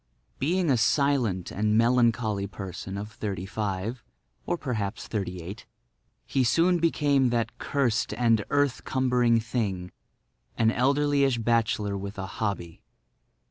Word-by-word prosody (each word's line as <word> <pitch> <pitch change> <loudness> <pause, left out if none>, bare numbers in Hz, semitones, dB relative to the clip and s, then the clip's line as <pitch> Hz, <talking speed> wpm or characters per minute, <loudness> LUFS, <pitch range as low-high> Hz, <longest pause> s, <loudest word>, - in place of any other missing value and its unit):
Being 170 +2 +1
a 130 - +3
silent 120 - +1
and 105 +1 +1
melancholy 115 -4 +2
person 95 0 -7
of 105 +2 -6
thirty 100 -4 -4
five—or 100 - -5
perhaps 110 -8 -3
thirty 90 -5 -3
eight—he 95 - -6
soon 170 +8 +3
became 145 -5 +2
that 115 -1 -2
cursed 130 -6 0
and 115 -3 +3
earth 145 -3 +1
cumbering 125 -3 +2
thing—an 105 - -3
elderlyish 140 +1 +2
bachelor 110 -3 +1
with 100 +1 -6
a 95 - -3 0.2
hobby. 100 -6 -3
115 Hz, 110 wpm, -27 LUFS, 100-130 Hz, 0.2 s, a